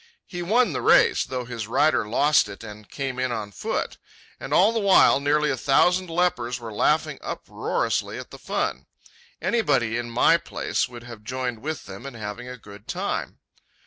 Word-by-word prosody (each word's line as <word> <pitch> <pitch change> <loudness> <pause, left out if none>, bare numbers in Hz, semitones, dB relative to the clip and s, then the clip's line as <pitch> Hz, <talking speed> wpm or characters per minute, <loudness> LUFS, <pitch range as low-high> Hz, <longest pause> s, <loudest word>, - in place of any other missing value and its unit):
He 175 -2 -6
won 230 +8 +2
the - - -2
race, - - +5
though 125 -1 -4
his 115 -3 -5
rider 145 -1 +2
lost 145 +6 +3
it 100 - -10
and 105 -2 -11
came 135 -2 -4
in 130 -1 0
on 110 -3 -4
foot. - - -3 0.4
And - - -7
all 205 +5 +5
the 230 - 0
while 195 -8 +5
nearly 150 +2 +2
a - - 0
thousand 180 +8 +3
lepers 150 -8 0
were 115 -2 -8
laughing 150 +9 +1
uproariously - - -2
at - - -9
the - - -10
fun. - - -2 0.6
Anybody 120 - +1
in 120 0 -5
my 120 +8 +4
place 170 - -2
would 120 -1 -10
have 120 -3 -11
joined 125 0 -3
with 155 +4 -5
them 100 +7 -9
in 135 - -9
having 110 +2 -6
a 125 0 -7
good 100 -2 -14
time. - - -3
125 Hz, 180 wpm, -24 LUFS, 115-155 Hz, 0.6 s, race